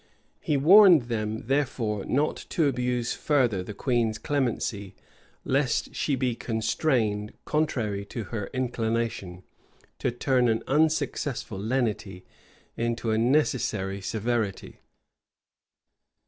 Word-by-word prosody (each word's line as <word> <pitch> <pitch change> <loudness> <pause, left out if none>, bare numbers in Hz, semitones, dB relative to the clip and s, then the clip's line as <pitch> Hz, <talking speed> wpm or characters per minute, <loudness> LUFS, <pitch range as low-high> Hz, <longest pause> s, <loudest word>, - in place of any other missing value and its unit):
He 150 - 0
warned 175 - +7
them, 110 -1 -3
therefore, 120 -6 -1
not 145 +4 +1
to 165 - +1
abuse 125 -3 0
further 125 -10 +1
the 100 +3 -8
queen's 120 -4 0
clemency, 115 -8 -2 0.5
lest 135 -1 0
she 145 - 0
be 130 -2 0
constrained, 110 -2 -1
contrary 120 -10 -1
to 115 +2 -5
her 105 -3 -3
inclination, 115 -7 -2 0.6
to - - 0
turn 125 +1 +1
an 115 -1 +1
unsuccessful 145 -7 0
lenity 105 -5 -2 0.5
into 115 -1 -1
a 110 - +1
necessary 115 -7 +1
severity. 110 -1 -2
120 Hz, 105 wpm, -26 LUFS, 105-135 Hz, 0.6 s, warned